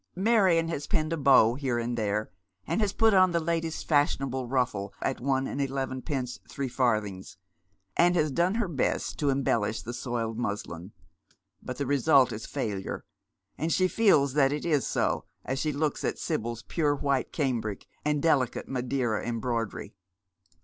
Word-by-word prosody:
Marion 190 -5 +3
has 150 -3 -4
pinned 155 0 0
a - - +1
bow 135 -6 +5
here 130 -2 -1
and 120 +1 -2
there, 105 -2 -1 0.3
and 220 - 0
has 205 -2 +1
put 225 +1 +3
on 185 -1 +6
the 170 - +3
last 165 0 -2
fashionable 135 -4 +1
ruffle 120 -6 -1
at 135 - -2
one 135 0 +1
and 140 - -3
eleven 135 -1 -2
pence 130 -5 -3
threefarthings, 110 -7 -1 0.6
and 175 +1 +4
has 155 -3 +2
done 175 +7 +1
her 230 -3 0
best 150 -7 -1
to 145 - +1
embellish 115 -5 0
the 120 - -5
soiled 115 -2 -3
muslin, 100 -5 -4 0.7
but 125 - -6
the 140 - -2
result 140 0 +4
is 110 0 -6
failure, 100 -3 -4 0.5
and 160 +2 -1
she 185 +2 +3
feels 155 - +3
that 140 -2 +4
it 150 0 -3
is 150 -5 +1
so - - 0 0.2
as 135 +1 -2
she 155 +1 0
looks 145 +1 -1
at - - -1
Sibyl's 115 0 -3
pure 150 -4 0
white 140 -2 -1
cambric 120 -8 -2 0.2
and 150 -1 0
delicate 135 -7 +1
Madeira 125 -3 -1
embroidery. 115 -3 -3
135 Hz, 165 wpm, -28 LUFS, 120-155 Hz, 0.7 s, on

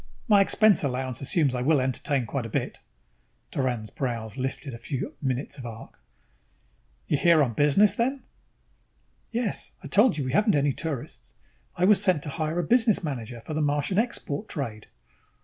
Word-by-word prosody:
My 205 -3 +6
expense 210 0 +4
allowance 130 -2 -2
assumes 140 0 +1
I 125 - -2
will 145 +3 +3
entertain 130 +1 -1
quite 120 +1 -3
a - - -11
bit." - - -3 0.7
Doran's 120 -5 -2
brows 115 -4 -4
lifted 135 0 -4
a 115 - -8
few 135 +2 -4
minutes 135 +1 -3
of 125 - -8
arc. 115 -1 -10 1.1
"You're 145 - 0
here 170 -3 +5
on 120 -4 -1
business, 150 - +4
then?" 265 +3 -1 1.1
"Yes. 235 -2 -3
I - - -6
told 210 -4 +4
you 140 - -2
we 130 - -2
haven't 210 - +3
any 145 0 +2
tourists. 145 -2 -6 0.4
I 175 - +2
was 200 0 +5
sent 185 -7 +2
to 150 - -4
hire 155 +2 -2
a 175 - +1
business 225 +2 +3
manager 120 -6 -5
for 155 - -7
the 155 - -1
Martian 145 +6 +1
export 220 - -3
trade." 115 - -5
145 Hz, 170 wpm, -26 LUFS, 130-185 Hz, 1.1 s, My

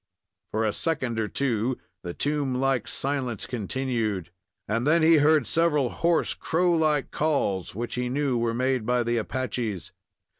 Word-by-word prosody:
For 110 +1 -1
a 105 - 0
second 130 -8 -1
or 110 - 0
two 125 -1 0 0.2
the 85 -1 -6
tomb 145 -3 -1
like 130 -2 +1
silence 130 -6 -2
continued, 115 -6 -2 0.4
and 115 +5 0
then 165 +1 +4
he 160 0 +6
heard 150 -2 +4
several 150 -2 +2
hoarse, 170 0 +1
crow 175 +2 +1
like 155 -3 +1
calls, 120 - 0
which 120 +2 -4
he 125 0 -2
knew 135 0 0
were 115 -1 0
made 130 -1 +1
by 125 +2 +1
the 120 0 0
Apaches. 115 -4 -3
130 Hz, 155 wpm, -26 LUFS, 115-145 Hz, 0.4 s, he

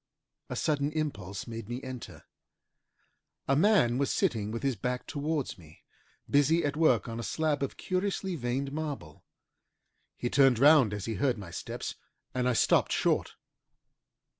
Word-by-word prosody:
A - - -4
sudden 145 -1 0
impulse 100 - -3
made 115 -1 -7
me 120 +1 -3
enter. 130 -3 -8 1.2
A 135 - +3
man 150 - +4
was 140 - +1
sitting 105 -3 0
with 115 +3 -5
his 135 -2 +1
back 125 +5 -3
towards 145 -5 -3
me, 80 -2 -17 0.4
busy 150 +4 +3
at 145 0 -1
work 150 -9 +3
on 115 0 -5
a - - -4
slab 155 +3 0
of 140 - -3
curiously 190 0 -2
veined 135 0 -2
marble. 145 - -5 0.9
He 120 - -2
turned 135 -1 +4
round 140 -3 +6
as 105 -2 -4
he 115 - -2
heard 130 -4 +2
my 95 -4 -9
steps - - -5 0.4
and 125 0 +1
I - - +2
stopped - - +3
short. - - +1
130 Hz, 155 wpm, -29 LUFS, 115-150 Hz, 1.2 s, round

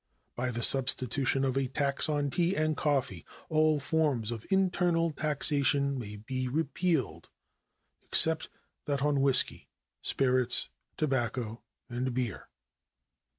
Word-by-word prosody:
By 125 +1 -2
the 120 0 -3
substitution 135 +1 +2
of 130 -1 -1
a 135 -1 0
tax 140 +2 0
on 145 -2 -1
tea 175 +3 0
and 155 0 0
coffee 135 - -1 0.3
all 155 -1 +2
forms 140 -7 -1
of 115 -2 -7
internal 175 -3 +1
taxation 140 -2 +1
may 105 -3 -7
be 130 +5 -4
repealed, 140 - -2 0.7
except 160 0 +4 0.4
that 140 -1 -2
on 145 -2 +1
whisky, 135 -2 +3 0.3
spirits, 130 -2 +2 0.3
tobacco, 120 -5 -2 0.3
and 125 +1 -4
beer. 120 -6 -4
135 Hz, 115 wpm, -29 LUFS, 125-155 Hz, 0.7 s, except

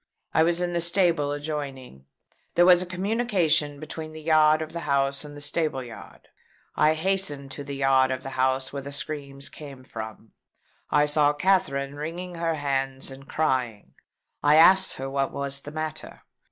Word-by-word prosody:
I - - +4
was 170 +2 +2
in 175 0 -1
the 170 - 0
stable 170 -4 +2
adjoining. 140 - -6 0.5
There 175 +1 +5
is 175 0 +6
a 180 - -4
communication 180 -7 +1
between 155 +1 -7
the 155 - -9
yard 155 0 +4
of 155 - -9
the 170 - -3
house 140 0 +1
and 145 -1 -10
the - - -10
stable 150 -3 -1
yard. 120 -2 -12 0.5
I 155 +1 +4
hastened 160 -6 -1
to 145 - -6
the 140 0 -6
yard 135 -1 +3
of 130 -1 -3
the 135 - -6
house 130 +1 0
where 140 - -4
the 140 +1 -8
screams 140 -1 -4
came 140 -4 -10
from. 110 -3 -8 0.6
I 150 0 +4
saw 150 0 +3
Katherine 150 -5 +1
wringing 165 +5 -6
her 165 -1 -1
hands 135 -2 -2
and 135 +1 -12
crying. 130 -8 -1 0.5
I 145 +1 +5
asked 190 +4 +6
her 135 - -5
what 135 0 -1
was 140 0 -4
the 145 - -9
matter? 155 -1 -6
145 Hz, 175 wpm, -26 LUFS, 135-165 Hz, 0.6 s, is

